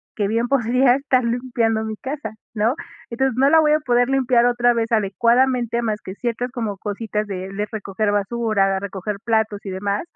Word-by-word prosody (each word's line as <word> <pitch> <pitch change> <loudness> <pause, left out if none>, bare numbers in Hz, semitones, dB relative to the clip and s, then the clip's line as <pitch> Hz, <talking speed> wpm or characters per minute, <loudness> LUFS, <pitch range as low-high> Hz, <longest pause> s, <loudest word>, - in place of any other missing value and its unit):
que 205 -2 0
bien, 230 +3 0
podría 250 0 +3
estar 265 -2 +1
limpiando 235 -2 0
mi 220 - -4
casa, 275 -4 -5 0.2
¿no? 220 +4 +2 0.4
Entonces, 265 0 0
no 275 +2 +4
la 320 - +7
voy 300 -1 +4
a 305 - +3
poder 245 -2 +2
limpiar, 255 -3 +3
otra 240 0 +3
vez, 230 0 -1
adecuadamente. 235 +3 +2
Más 215 -2 -2
que 190 - -8
ciertas, 240 +2 -3
como 225 -6 -3
cositas, 210 +1 -3
de 190 -1 -5
le 205 +1 -2
recoger 205 -1 -2
basura, 205 -1 +1
de 190 - -1
recoger 200 +1 -5
platos, 220 -3 0
y - - -4
demás. 200 +2 -2
230 Hz, 190 wpm, -21 LUFS, 205-245 Hz, 0.4 s, la